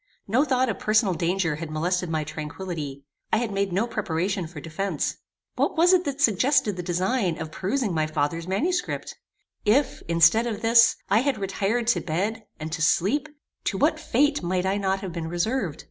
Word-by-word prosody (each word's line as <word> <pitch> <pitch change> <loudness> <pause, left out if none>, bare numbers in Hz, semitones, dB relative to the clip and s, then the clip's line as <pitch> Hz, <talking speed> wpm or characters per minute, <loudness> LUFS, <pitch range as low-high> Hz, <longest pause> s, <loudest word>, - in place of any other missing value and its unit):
No 235 +8 +3
thought 260 -3 +1
of 210 -5 -3
personal 215 -3 +2
danger 170 -2 0
had 160 0 -6
molested 175 +3 -1
my 160 -1 -1
tranquillity. 150 -2 -6 0.3
I - - +4
had 230 -1 -1
made 200 -1 -1
no 195 +6 +1
preparation 190 -4 -2
for 160 -2 -9
defence. 165 +6 -3 0.4
What - - 0
was 350 +3 +5
it 365 -1 +3
that 280 -1 -3
suggested 250 -2 +3
the 180 - -4
design 180 +1 0
of 160 -1 -5
perusing 200 - -1
my 155 -1 +1
father's 155 +2 -2
manuscript? 350 - -1 0.5
If, 255 +6 +2
instead 170 +8 +4
of 220 -2 -4
this, 230 0 +6 0.2
I 205 - +5
had 275 0 0
retired 200 +4 -1
to 235 - +2
bed, 200 +7 -2
and 155 +1 -5
to 160 -1 -3
sleep, 205 - +2 0.4
to - - -1
what - - +2
fate 290 +1 +1
might 180 +1 -1
I 195 +1 +1
not 195 -1 0
have 185 -4 -5
been 165 -1 -4
reserved? 175 - -1
190 Hz, 185 wpm, -25 LUFS, 165-230 Hz, 0.5 s, this